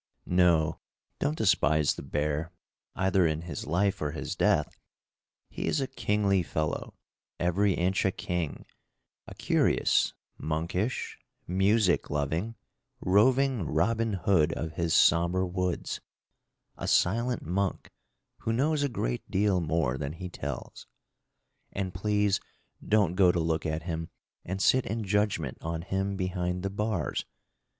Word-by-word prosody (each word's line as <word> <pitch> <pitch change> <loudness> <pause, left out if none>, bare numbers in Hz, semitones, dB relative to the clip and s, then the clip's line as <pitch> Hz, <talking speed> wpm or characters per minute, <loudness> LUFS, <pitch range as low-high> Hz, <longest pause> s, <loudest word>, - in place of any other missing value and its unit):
No, 85 -3 +3 0.4
don't 75 +2 0
despise 75 -1 +3
the - - -8
bear, 75 +4 -2 0.4
either 95 -2 +3
in 80 +1 -2
his 80 -6 -6
life 100 +5 +1
or 75 -1 -1
his 80 - -4
death. - - +1 0.7
He - - -5
is - - +1
a 135 - 0
kingly 105 -6 +1
fellow, 80 -2 -3 0.4
every 95 +3 +2
inch 95 +3 +1
a 95 - +2
king; 90 -5 -3 0.6
a - - -9
curious, - - +2 0.2
monkish, 85 +9 -2 0.3
music 95 +1 +2
loving, 80 +10 -1 0.4
roving 125 +6 +3
Robin 110 +7 +1
Hood 90 -4 +2
of 80 -1 -4
his 85 0 0
somber 85 +2 +4
woods 90 -1 -2 0.8
a - - -4
silent 115 +6 +2
monk, 95 +3 -2 0.5
who 115 - -2
knows 145 +6 +1
a 145 - +1
great - - -3
deal 95 -2 +2
more 75 -5 0
than 70 0 -3
he 90 +2 -7
tells. 70 -6 -6 0.9
And 95 -2 -3
please 105 +1 +1 0.4
don't 105 -5 +2
go 90 -1 +5
to 90 - -1
look 80 -1 0
at 80 +1 -2
him 80 -1 -4 0.3
and 95 +2 -3
sit 130 -1 +4
in 110 +2 -2
judgment 100 - 0
on 80 0 -3
him 95 +1 -1
behind 90 -1 -2
the 95 - -2
bars. 105 -5 -1
90 Hz, 135 wpm, -29 LUFS, 80-100 Hz, 0.9 s, go